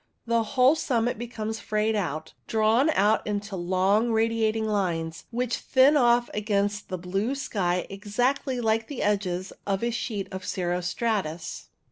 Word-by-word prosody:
The 235 0 +2
whole 255 +5 +4
summit 245 -7 0
becomes 225 -2 -4
frayed 215 +1 0
out, 160 -6 -3
drawn 225 +6 +3
out 210 -7 +2
into 205 -1 -3
long 190 +5 +2
radiating 225 -1 +1
lines, 170 -6 -1
which 245 0 -1
thin 270 +3 +4
off 240 -3 +4
against 205 -1 -1
the 185 - -3
blue 195 +8 -2
sky 180 -9 -1
exactly 245 +6 -1
like 225 -1 +1
the 285 - -4
edges 195 -3 -1
of 195 +1 0
a 235 - +1
sheet 215 -4 -3
of 190 -1 -6
cirro 180 -1 -1
stratus. 175 -4 -2
215 Hz, 145 wpm, -26 LUFS, 190-235 Hz, -, whole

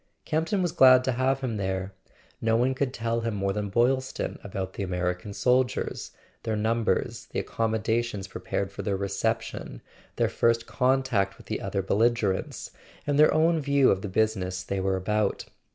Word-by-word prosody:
Campton 165 +5 0
was 175 - 0
glad 130 -6 +7
to 130 - +1
have 130 +2 +1
him 120 -5 -2
there; 95 0 -2 0.5
no 115 0 +2
one 125 +3 +2
could 130 0 -1
tell 115 -1 -2
him 115 -2 -2
more 100 -1 -1
than 105 0 -3
Boylston 130 +5 0
about 95 -1 -5
the - - -6
American 90 +1 -2
soldiers, 125 +4 0 0.3
their 110 -2 -2
numbers, 110 +1 0
the - - -2
accommodations 110 -2 -1
prepared 95 +1 -3
for - - -6
their 100 -2 -1
reception, 100 - -2 0.4
their - - +2
first 115 0 +1
contact 125 -7 +1
with - - -15
the - - -3
other 95 - -2
belligerents, 110 -1 0 0.3
and 145 0 +1
their 155 - +7
own 160 +1 +3
view 140 -2 +3
of 95 - 0
the 100 - -4
busi¬ 110 +2 +1
ness 90 0 -4
they 100 - -3
were 95 0 0
about. 105 +2 -1
110 Hz, 170 wpm, -27 LUFS, 100-130 Hz, 0.5 s, glad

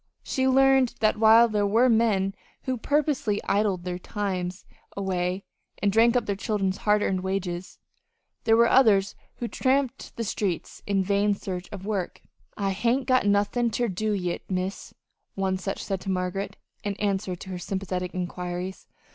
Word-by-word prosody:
She 265 0 0
learned 265 -1 +4
that 215 -1 +2
while 225 +1 +7
there 210 -2 +1
were 230 +5 +4
men 220 -5 +2 0.3
who 260 - -1
purposely 265 -5 0
idled 200 -4 +1
their 180 0 -4
time 190 -3 -2 0.5
away 185 -1 -1 0.3
and 205 - +1
drank 230 +3 +4
up 245 - +2
their 200 - -1
children's 195 -1 -1
hard 210 0 +2
earned 185 -1 0
wages, 185 -1 -3 0.7
there 225 0 +4
were 235 0 +6
others 205 -7 +4 0.2
who 240 - -4
tramped 265 +1 0
the 230 - -3
streets 195 -4 -3
in 195 -1 +2
vain 200 +2 +2
in 205 - +3
search 185 -2 -6
of 195 -2 -7
work. 200 -4 -3 0.3
"I 195 -1 0
hain't 235 +7 +1
got 255 -4 +3
nothin' 205 +4 +2
ter 240 +2 0
do 215 +4 -1
yit, 180 -4 -2
Miss," 185 +1 -3 0.4
one 190 -1 0
such 195 +1 -4
said 195 -2 -3
to 195 - -5
Margaret, 190 +2 -2 0.3
in 205 -1 -2
answer 195 -2 -1
to 190 - -10
her 180 -1 -5
sympathetic 185 -1 -3
inquiries. 180 +1 -4
200 Hz, 165 wpm, -26 LUFS, 190-225 Hz, 0.7 s, while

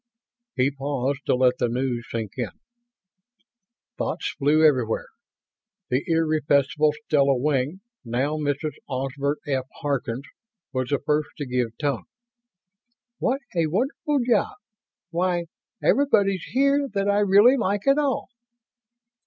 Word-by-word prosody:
He 130 +2 +2
paused 140 0 -3
to - - +4
let 125 0 +3
the 120 - +1
news 120 -1 -2
sink 110 -3 -3
in. 120 -3 -2 1.5
Thoughts - - -2
flew 155 +2 +3
everywhere. 125 -7 +2 0.8
The 130 +3 +1
irrepressible 155 -2 +2
Stella 140 -2 +3
Wing 145 +6 0 0.2
now 130 +6 -1
Mrs. 150 +1 -1 0.2
Osbert 135 +2 -2
F. 130 -2 -1
Harkins 140 -3 -2 0.5
was 130 -1 -1
the 145 - +2
first 150 +1 0
to 145 - -3
give 125 -3 -2
tongue. 140 -5 -1 1.1
"What 265 +3 0
a 165 -2 +2
wonderful 270 - 0
job! 240 - +2 0.6
Why, 175 0 0 0.4
everybody's 200 - +3
here 280 +2 +2
that 195 0 +1
I 205 0 +3
really 205 +5 +6
like 205 -4 -1
at 275 +2 +4
all!" 280 -3 0
145 Hz, 120 wpm, -24 LUFS, 130-190 Hz, 1.5 s, really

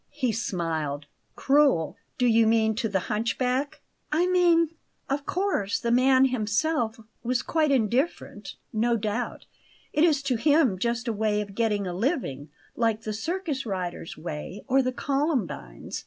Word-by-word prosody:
He 265 -5 -1
smiled. 165 -9 -2 0.3
"Cruel? 275 - +3 0.2
Do 250 - +2
you 230 -1 +5
mean 220 -1 +3
to 230 -2 0
the 190 -2 0
hunchback?" 250 +7 -1 0.3
"I 325 +4 +3
mean 350 -3 +4 0.4
Of 280 +1 -2
course 360 - 0
the 235 - -1
man 260 +2 +5
himself 235 +1 0 0.2
was 245 +1 0
quite 315 -2 +1
indifferent; 240 - -1 0.2
no 230 +2 +2
doubt, 215 +3 -3 0.5
it 300 - +3
is 300 -5 +3
to 260 -3 0
him 280 - +3
just 235 +3 -1
a 230 - 0
way 210 0 0
of 205 -1 -5
getting 210 -2 0
a 180 - -3
living, 185 - -2 0.3
like 225 -2 +1
the 215 - -3
circus 320 - -3
rider's 185 -6 -4
way 160 +4 -6
or 270 0 +4
the 255 -1 -1
columbine's. 270 - -2
235 Hz, 150 wpm, -26 LUFS, 210-280 Hz, 0.5 s, you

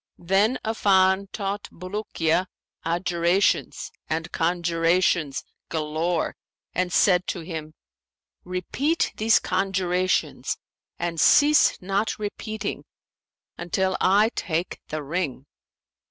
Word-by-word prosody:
Then 195 +8 +2
Affan 195 -3 +3
taught 200 0 -4
Bulukiya 185 -2 -1 0.4
adjurations 175 +2 +1 0.2
and 160 +1 -2
conjurations 170 -2 +1 0.3
galore 160 +2 -1 0.4
and 180 0 0
said 180 0 +3
to 175 - -3
him, 160 -2 -7 0.7
'Repeat 220 - -1
these 220 +1 +4
conjurations 185 -1 0 0.4
and 170 -2 -2
cease 300 +1 +5
not 200 +3 0
repeating 215 0 -4 0.8
until 185 +2 0
I 205 +4 +4
take 170 +1 -2
the 155 -1 -4
ring.' 145 -3 -3
180 Hz, 90 wpm, -25 LUFS, 170-200 Hz, 0.8 s, cease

